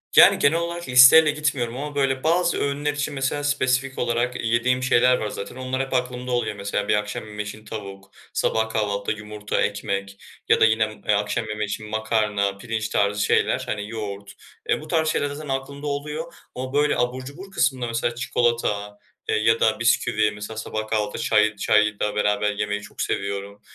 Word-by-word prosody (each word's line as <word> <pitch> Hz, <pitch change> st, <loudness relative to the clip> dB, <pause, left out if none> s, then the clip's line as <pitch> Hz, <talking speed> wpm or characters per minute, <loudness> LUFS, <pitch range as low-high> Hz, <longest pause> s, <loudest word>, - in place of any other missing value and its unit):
Yani, -, -, +8 dB
genel 165 Hz, +4 st, +3 dB
olarak 170 Hz, -3 st, -4 dB
listeyle 130 Hz, +5 st, +8 dB
gitmiyorum 140 Hz, -5 st, -2 dB
ama, 145 Hz, +1 st, -5 dB
böyle, 135 Hz, -1 st, 0 dB
bazı 170 Hz, +1 st, +2 dB
öğünler 145 Hz, +1 st, -1 dB
için 145 Hz, 0 st, -3 dB
mesela 135 Hz, +2 st, -1 dB
spesifik 135 Hz, -2 st, 0 dB
olarak 120 Hz, +1 st, -1 dB
yediğim 120 Hz, +3 st, +1 dB
şeyler 125 Hz, -1 st, +4 dB
var 110 Hz, -, -3 dB
zaten. 100 Hz, -, -7 dB
Onlar 130 Hz, 0 st, -2 dB
hep 135 Hz, -, -4 dB
aklımda 125 Hz, 0 st, -2 dB
oluyor. 120 Hz, -4 st, -1 dB
Mesela 100 Hz, 0 st, -3 dB
bir -, -, +3 dB
akşam 105 Hz, +1 st, -3 dB
yemeği 105 Hz, -1 st, -6 dB
için 110 Hz, +1 st, -9 dB
tavuk, 100 Hz, -3 st, -8 dB, 0.2 s
sabah 110 Hz, 0 st, 0 dB
kahvaltıda 105 Hz, -1 st, -1 dB
yumurta, 105 Hz, 0 st, -3 dB
ekmek 100 Hz, -1 st, -2 dB, 0.3 s
ya -, -, +5 dB
da -, -, +8 dB
yine 110 Hz, 0 st, +3 dB
m 110 Hz, -, -9 dB
eee, 105 Hz, -, +4 dB
akşam 105 Hz, +3 st, -1 dB
yemeği 105 Hz, 0 st, -2 dB
için 110 Hz, +1 st, -5 dB
makarna, 105 Hz, -2 st, 0 dB
pirinç 110 Hz, +1 st, -3 dB
tarzı 105 Hz, 0 st, +1 dB
şeyler, -, -, +2 dB
hani, 105 Hz, +1 st, -4 dB
yoğurt, 100 Hz, -3 st, -6 dB, 0.4 s
eee, -, -, +1 dB
bu 155 Hz, -, -10 dB
tarz 160 Hz, -1 st, +1 dB
şeyler 145 Hz, -2 st, 0 dB
zaten 145 Hz, 0 st, -7 dB
aklımda 140 Hz, +2 st, -4 dB
oluyor 150 Hz, +4 st, -4 dB, 0.2 s
ama, 130 Hz, +1 st, -5 dB
böyle, 145 Hz, +1 st, +2 dB
abur 125 Hz, +1 st, -1 dB
cubur 185 Hz, +8 st, -10 dB
kısmında 130 Hz, -9 st, 0 dB
mesela 115 Hz, +1 st, -1 dB
çikolata, 115 Hz, -5 st, -1 dB, 0.3 s
eee, -, -, +2 dB
ya 115 Hz, +1 st, +3 dB
da 110 Hz, -, +2 dB
bisküvi, 110 Hz, -2 st, +2 dB
mesela 105 Hz, +1 st, -8 dB
sabah 110 Hz, 0 st, -4 dB
kahvaltıda 105 Hz, -2 st, -1 dB
çay 110 Hz, -1 st, +3 dB
çay 105 Hz, +1 st, +2 dB
da 105 Hz, 0 st, -1 dB
beraber 105 Hz, 0 st, +1 dB
yemeyi 105 Hz, 0 st, -2 dB
çok 105 Hz, -, -8 dB
seviyorum. 100 Hz, +1 st, -3 dB
115 Hz, 185 wpm, -23 LUFS, 105-135 Hz, 0.4 s, Yani